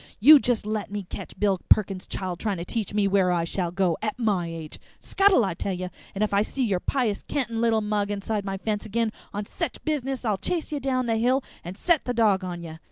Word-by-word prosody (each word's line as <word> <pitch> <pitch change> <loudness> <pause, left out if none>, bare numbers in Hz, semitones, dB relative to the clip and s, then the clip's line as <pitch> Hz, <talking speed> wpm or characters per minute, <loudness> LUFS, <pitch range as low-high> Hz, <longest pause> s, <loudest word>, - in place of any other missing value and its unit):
You 290 +7 +9
just 245 -5 0
let 215 -1 -2
me 205 0 -4
ketch 180 - -9
Bill 195 -3 +2
Perkins' 195 -3 +3
child 180 -2 -4
trying 205 -4 -1
to 170 - -5
teach 220 0 -3
me 205 -1 +2
where 190 -2 +3
I 170 -1 +1
shall 175 +1 -2
go, 180 -2 0
at 215 +2 -2
my 205 -8 0
age! 165 -2 -7 0.2
Scuttle, 390 - +4
I 190 - -1
tell 190 +3 -3
ye! 180 0 -4 0.3
And 200 - 0
if 210 - -1
I 200 - +4
see 260 +5 -2
your 195 -5 +1
pious 235 -2 0
cantin' 235 -5 -2
little 225 -2 +3
mug 210 -1 -1
inside 205 +1 -2
my 195 -1 -3
fence 210 +1 -2
ag'in 230 +1 0 0.2
on 205 0 -4
sech 335 - -4
a - - -26
business 270 -4 -2
I'll 210 -4 0
chase 335 -3 -2
ye 295 - -1
down 255 -2 0
the 225 -1 +1
hill 250 +4 +2 0.2
or 175 - -6
set 335 - +2
the 245 - -2
dog 210 -4 +3
on 175 -2 -5
ye! 160 -1 -8
210 Hz, 240 wpm, -25 LUFS, 190-235 Hz, 0.3 s, You